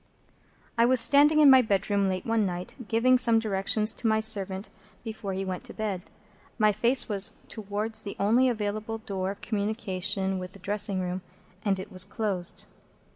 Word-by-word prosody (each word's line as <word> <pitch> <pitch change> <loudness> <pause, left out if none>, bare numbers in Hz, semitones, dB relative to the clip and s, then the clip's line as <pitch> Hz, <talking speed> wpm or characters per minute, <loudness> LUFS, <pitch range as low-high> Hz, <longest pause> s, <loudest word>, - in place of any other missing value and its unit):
I 230 - +6
was 255 0 +5
standing 290 +6 +5
in 290 - +8
my 260 -1 +8
bedroom 200 -2 0
late 185 -1 -3
one 225 -1 +1
night, 180 -2 -4
giving 250 +3 +3
some 235 -2 +4
directions 215 0 0
to 230 - -3
my 220 0 +2
servant 200 -3 0 0.4
before 220 -4 -5
he 190 +1 -3
went 185 -1 -5
to - - -7
bed. 205 -4 -3 0.6
My 215 -2 +4
face 235 +5 +3
was 205 +1 0
towards 215 +1 -4
the 200 - -7
only 235 +6 +3
available 215 0 -3
door 190 -3 -4
of 200 +1 -7
communication 195 -3 -2
with 180 0 -8
the - - -13
dressing 200 0 -1
room, 180 +1 -4 0.4
and 195 -2 0
it 190 - -8
was 185 -1 +1
closed. 195 -5 -4
210 Hz, 175 wpm, -27 LUFS, 195-225 Hz, 0.6 s, in